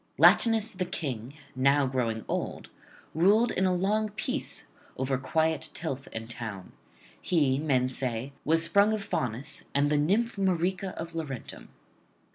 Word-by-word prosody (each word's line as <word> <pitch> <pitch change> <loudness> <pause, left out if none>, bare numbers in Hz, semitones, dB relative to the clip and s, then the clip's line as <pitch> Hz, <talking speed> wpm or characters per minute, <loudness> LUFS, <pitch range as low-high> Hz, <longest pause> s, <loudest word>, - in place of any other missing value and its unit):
Latinus 225 -2 +5
the 185 -3 -3
King, 135 -7 -4 0.2
now 135 +2 +3
growing 120 -4 -1
old, - - -3 0.4
ruled 205 +8 +4
in 190 +1 +1
a - - +2
long 210 +4 +1
peace 235 +7 -3 0.3
over 135 0 0
quiet 160 +3 0
tilth 140 -5 -3
and 110 0 -6
town. 110 -5 -6 0.5
He, 140 -6 +2
men 135 -4 +2
say, 130 0 -3
was 160 +2 +3
sprung 200 +5 +4
of 215 -2 -2
Faunus 125 - -2
and 145 +1 +3
the 150 - +3
nymph 210 +10 +1
Marica 185 0 0
of 165 +1 -5
Laurentum. 150 -7 -6
160 Hz, 140 wpm, -28 LUFS, 130-190 Hz, 0.5 s, Latinus